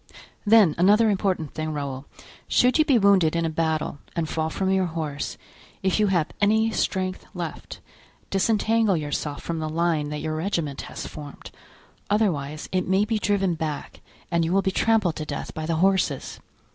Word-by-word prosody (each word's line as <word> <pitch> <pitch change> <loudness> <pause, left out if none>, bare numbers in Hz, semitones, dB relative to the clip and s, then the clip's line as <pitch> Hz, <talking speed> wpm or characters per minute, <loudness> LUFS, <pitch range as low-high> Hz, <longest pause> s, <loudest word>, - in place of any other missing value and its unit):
Then 210 -7 +6
another 210 +4 +5
important 185 -6 -1
thing, 155 0 -3
Raoul: 140 -2 -4 0.4
should 250 +5 +3
you 310 - +5
be 270 -5 +4
wounded 195 -6 +4
in 170 0 +1
a 160 - -1
battle, 160 -2 -1 0.2
and 165 -2 -1
fall 160 0 -1
from 190 +3 -1
your 190 -1 +2
horse, 155 -4 -4 0.5
if 190 +2 +1
you 210 - +4
have 175 -5 +1
any 220 +2 +3
strength 185 -3 -2
left, - - -6 0.5
disentangle 215 0 +2
yourself 145 -1 -3
from 165 -1 -3
the 155 0 -3
line 160 -2 0
that 150 - -4
your 155 0 -2
regiment 160 -4 -2
has - - -6
formed; 145 -2 -9 0.6
otherwise, 155 -9 0
it 185 -1 0
may 190 +2 +3
be 220 0 -1
driven 195 -3 +1
back 155 -2 -5 0.3
and 170 -1 +2
you 165 - -1
will 195 +1 +3
be 190 - +1
trampled 210 -5 +2
to 155 - -3
death - - -5
by 155 0 -4
the 165 - 0
horses. 180 -5 +1
175 Hz, 175 wpm, -24 LUFS, 155-200 Hz, 0.6 s, Then